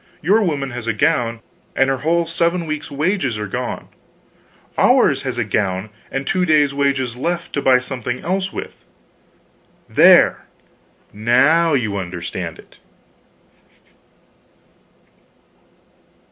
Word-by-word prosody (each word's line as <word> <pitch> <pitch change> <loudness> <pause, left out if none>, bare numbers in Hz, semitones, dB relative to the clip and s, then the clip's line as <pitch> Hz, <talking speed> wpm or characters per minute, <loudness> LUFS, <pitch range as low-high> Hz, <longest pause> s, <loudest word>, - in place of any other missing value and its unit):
Your 205 +8 +3
woman 145 -8 -1
has 120 -1 -7
a 115 - +1
gown, 120 -4 0 0.3
and 135 - +3
her 135 0 0
whole 170 +4 +1
seven 170 +1 0
weeks 155 -1 -4
wages 150 - -1
are 105 - -4
gone; 100 - -5 0.9
ours - - +3
has - - -4
a - - +1
gown, 100 0 -2 0.2
and 135 0 -4
two 185 +4 0
days' 150 -4 +3
wages 135 -4 0
left, 170 +6 -3
to 140 - -1
buy 130 -2 +5
something 125 -1 -4
else 190 +1 -1
with. - - -8 1.0
There - - +5 0.7
now 140 +10 +3
you 110 -6 -1
understand 90 -2 -5
it!" - - -18
135 Hz, 120 wpm, -19 LUFS, 115-165 Hz, 1.0 s, buy